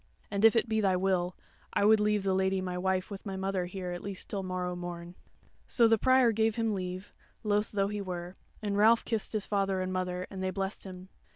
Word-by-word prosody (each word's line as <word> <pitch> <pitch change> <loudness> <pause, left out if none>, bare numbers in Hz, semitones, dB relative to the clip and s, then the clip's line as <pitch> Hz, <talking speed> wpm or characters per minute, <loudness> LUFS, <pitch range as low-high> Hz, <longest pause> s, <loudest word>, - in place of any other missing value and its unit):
And 200 0 -1
if 225 +1 +7
it 230 - +3
be 220 -1 +1
thy 190 -2 +3
will, 180 -1 0 0.4
I 200 - +2
would 215 +1 +6
leave 210 -1 +2
the 195 -1 +1
Lady 190 0 +1
my 185 -1 -3
wife 185 +2 -1
with 195 - -7
my 195 -2 -5
mother 190 -1 -1
here 180 -1 -5
at 175 0 -5
least 195 -2 -6
till 200 - -1
morrow 180 -1 -3
morn." 175 -1 -6 0.5
So 235 -2 +4
the 225 -1 +4
Prior 260 -1 +5
gave 220 0 +1
him 225 -2 0
leave, 185 0 -5 0.3
loth 210 0 +1
though 200 -1 +1
he 210 0 -3
were, 180 -2 -5 0.3
and 205 -1 -1
Ralph 220 +3 +5
kissed 225 -2 -2
his 215 -2 -1
father 195 -2 0
and 185 0 -2
mother, 180 0 -2
and 190 -1 -6
they 190 - 0
blessed 195 +2 -4
him. 185 0 -9
195 Hz, 225 wpm, -30 LUFS, 185-210 Hz, 0.5 s, if